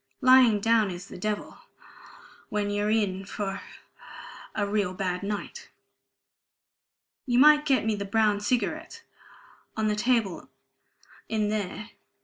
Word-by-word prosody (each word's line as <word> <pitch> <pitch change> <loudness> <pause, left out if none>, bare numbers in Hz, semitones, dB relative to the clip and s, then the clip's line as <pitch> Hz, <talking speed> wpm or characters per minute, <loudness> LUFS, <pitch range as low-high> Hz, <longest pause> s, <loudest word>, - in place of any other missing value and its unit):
"Lying 255 -5 +6
down 225 -1 +3
is 180 0 -7
the - - -11
devil... 210 +2 -4 0.9
when 205 -1 -1
you're 205 +1 0
in 200 -3 0
for 195 0 -5 0.9
a 205 - 0
real 200 -3 -1
bad 180 -1 -2
night. 205 0 -5 1.6
You 245 -1 +1
might 300 +2 +6
get 265 -5 +2
me 220 - +1
the 200 -1 -3
brown 210 0 +1
cigarettes... 255 - -2 0.8
on 215 -1 +1
the 210 - 0
table 225 -5 0 0.8
in 215 -2 0
there. 210 +1 -4
210 Hz, 125 wpm, -27 LUFS, 200-230 Hz, 1.6 s, Lying